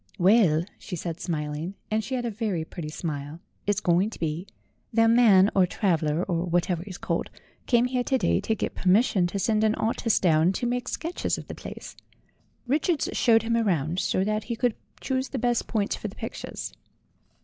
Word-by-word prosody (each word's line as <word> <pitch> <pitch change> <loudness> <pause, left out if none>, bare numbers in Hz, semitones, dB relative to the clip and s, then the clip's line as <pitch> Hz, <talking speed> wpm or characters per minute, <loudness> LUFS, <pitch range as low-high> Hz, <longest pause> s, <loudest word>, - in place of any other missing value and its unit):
"Well," 180 -4 +4
she 185 - -6
said, 170 0 -5
smiling 155 +2 -3 0.2
and 220 +1 +1
she 260 +5 -3
had 245 -1 -2
a 235 - -1
very 200 -7 -2
pretty 160 -2 -7
smile 155 -1 -5 0.3
"it's 205 -1 +2
going 180 +2 +2
to - - -11
be. 165 +4 -3 0.4
Their 225 0 +4
man, 220 -4 +6
or 185 -2 +5
traveller, 165 -5 0
or 175 -2 -1
whatever 175 0 0
it's 185 - -7
called, - - -2 0.4
came 240 -1 +4
here 250 0 0
to 265 - +2
day - - +2
to 220 - 0
get - - -3
permis 195 +6 +4
sion 180 -7 +1
to 190 - -4
send 215 +2 +1
an 215 0 +3
artist 225 0 +1
down 165 +1 +4
to 240 - -2
make 245 +1 -1
sketches 335 +6 -2
of - - -8
the - - -6
place. - - -9 0.7
Richards 295 +4 +1
showed 225 -2 +4
him 230 0 -1
round, 175 -7 +1
so 185 - +1
that 215 +1 -1
he 235 - -3
could 240 0 +1 0.3
choose 260 0 -1
the 275 - -4
best 240 -1 0
points 210 -2 0
for - - -5
the - - -10
pictures." - - -6
200 Hz, 195 wpm, -26 LUFS, 170-230 Hz, 0.7 s, man